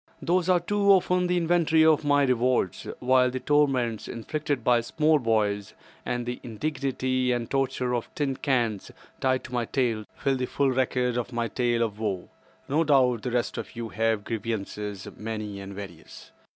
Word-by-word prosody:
These 180 +1 +1
are 180 -1 +5
too 200 +3 0
often 180 -1 +2
the 180 0 +1
inventory 165 -2 +3
of 155 -1 +4
my 145 -1 +3
rewards; 125 -7 +1
while 130 0 +4
the 130 +1 -4
torments 130 -6 +1
inflicted 145 +2 -3
by 120 0 +4
small 155 +5 +2
boys, 105 -4 0 0.3
and 120 -1 -2
the 125 0 -4
indignity 130 0 -1
and 120 -1 -1
torture 130 -2 0
of 120 -2 -2
tin 140 -3 -1
cans 120 -8 0 0.3
tied 130 -1 +1
to 125 - -10
my 120 -1 0
tail, 115 -4 -1
fill 135 -1 0
the 125 0 -2
full 140 -2 +1
record 125 -1 0
of 120 +1 -3
my 120 -1 -1
tale 120 +1 0
of 105 -2 -4
woe. 100 -5 -3 0.4
No 150 +4 +2
doubt 130 -6 +3
the 125 - -3
rest 120 0 -1
of - - -8
you 115 -1 -5
have 110 +2 0
grievances 105 -3 -4
many 105 -2 -5
and 100 0 -8
various. 100 -1 -10
125 Hz, 175 wpm, -26 LUFS, 115-145 Hz, 0.4 s, are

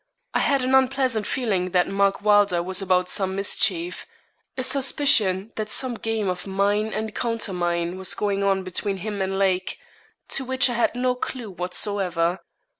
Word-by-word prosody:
I - - +2
had 275 -2 +2
an 260 +1 0
unpleasant 260 -4 +2
feeling 195 -8 -1
that 180 -1 +3
Mark 195 0 +1
Wylder 205 -4 +4
was 185 +2 -1
about 180 -1 +2
some 190 0 -1
mischief 180 -3 0 0.5
a 255 - -1
suspicion 240 -8 +2
that 215 -1 -3
some 255 +2 -1
game 225 -2 -2
of 180 +1 -3
mine 200 +2 +1
and 215 0 -4
countermine 180 -6 -2
was 190 - 0
going 200 -1 -1
on 195 -1 +1
between 195 +2 -3
him 205 +1 -4
and 190 0 -1
Lake, 190 -1 0 0.5
to 275 - 0
which 260 0 +3
I - - -2
had 240 0 +1
no 250 0 +1
clue 250 -3 -5
whatsoever. 180 -1 -1
200 Hz, 165 wpm, -24 LUFS, 185-230 Hz, 0.5 s, Wylder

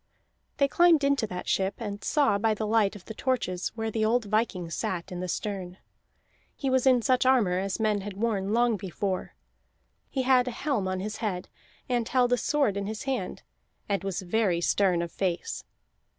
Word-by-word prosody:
They 280 - +4
climbed 335 0 +4
into 280 -5 +2
that 180 -2 -6
ship, 195 +1 +1
and 205 -3 -5
saw 275 -9 +2
by 220 0 +2
the 215 - -3
light 215 -1 +2
of 195 - -12
the 220 - -7
torches 215 -8 -1
where 225 -1 -2
the 220 0 0
old 230 +1 +2
viking 205 -5 -1
sat 185 -3 -3
in 180 - -5
the 185 - -3
stern. 185 -1 -4 0.8
He 270 -2 -2
was 260 0 +3
in 250 -3 +5
such 255 0 +3
armor 230 -9 +3
as 195 +2 -2
men 215 -2 +1
had 205 +1 -6
worn 205 -3 0
long 235 -1 +3
before; 190 0 -3 0.7
he 265 - -1
had 255 -1 +4
a 240 - -4
helm 265 -10 0
on 185 0 -2
his 210 +2 -4
head, 190 -5 -3 0.4
and 240 -3 0
held 250 -1 +3
a - - +3
sword 275 -8 +1
in 200 0 -2
his 215 0 -5
hand, 270 -1 -3 0.4
and 200 -1 -1
was 195 0 -3
very 185 -2 +1
stern 175 0 +2
of 170 - -6
face. 180 -3 -2
215 Hz, 195 wpm, -28 LUFS, 190-245 Hz, 0.8 s, in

